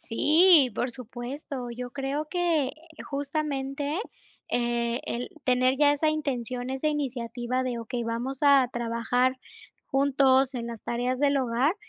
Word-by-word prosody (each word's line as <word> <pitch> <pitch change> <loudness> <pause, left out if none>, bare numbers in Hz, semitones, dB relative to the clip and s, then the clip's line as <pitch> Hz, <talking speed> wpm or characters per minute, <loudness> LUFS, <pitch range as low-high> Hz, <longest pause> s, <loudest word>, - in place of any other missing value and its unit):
Sí, 310 +3 +5
por 245 0 -1
supuesto. 250 +1 -7
Yo 250 0 -5
creo 280 +3 -3
que, 335 -4 +1
eh, - - -8 0.3
justamente, 285 +1 -3 0.5
eh, 240 0 0
el 245 +1 -3
tener 255 0 +2
ya 290 +1 +5
esa 290 +2 +1
intención, 255 -5 -2
esa 265 +3 -2
iniciativa 255 -3 -2
de: 245 -2 -3
"Okey, 235 +1 -4
vamos 240 +4 -3
a 275 -3 +6
trabajar 240 +2 0 0.5
juntos 270 -1 +3
en 235 -1 -4
las 230 -2 -8
tareas 245 +2 -1
del 285 0 +2
hogar.", 260 +6 +1
260 Hz, 135 wpm, -27 LUFS, 240-285 Hz, 0.5 s, a